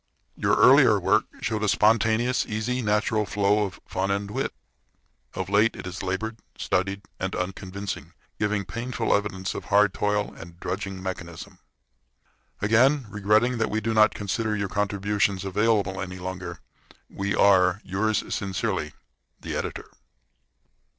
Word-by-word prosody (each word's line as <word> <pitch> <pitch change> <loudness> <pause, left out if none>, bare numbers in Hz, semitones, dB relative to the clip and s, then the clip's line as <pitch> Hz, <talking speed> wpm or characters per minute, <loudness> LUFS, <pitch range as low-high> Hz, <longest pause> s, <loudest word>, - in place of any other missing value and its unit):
Your - - +2
earlier - - +6
work - - +2 0.2
showed 110 -1 -1
a 105 - +1
spontaneous, 115 +4 +3
easy, 115 +4 -2
natural 105 0 +1
flow 105 +1 +2
of 95 - -8
fun 95 +1 -2
and 100 +1 -1
wit. - - -2 0.8
Of 95 -1 -3
late 105 +3 +3
it - - -8
is 90 0 -5
labored, 110 +4 -3 0.2
studied, 95 +2 -1 0.2
and 95 0 -2
unconvincing, 95 +2 -5 0.3
giving 105 -1 0
painful 115 +6 -2
evidence 95 -2 -2
of - - -6
hard 100 -1 +4
toil 105 0 0
and 85 +1 -12
drudging 95 -1 -4
mechanism. 85 -3 -7 1.0
Again 130 +6 +4
regretting 110 +4 +2
that 110 - +1
we 110 - 0
do 110 +1 -1
not 110 -1 +5
consider 105 +2 -1
your 100 -1 -2
contributions 100 -1 0
available 100 -1 +1
any 90 -1 -5
longer, 90 -1 -6 0.5
we 100 0 -2
are, 95 -1 +4
yours 105 +3 0
sincerely, 95 -5 -2 0.5
THE - - -5
EDITOR. - - -4
100 Hz, 135 wpm, -25 LUFS, 95-110 Hz, 1.0 s, earlier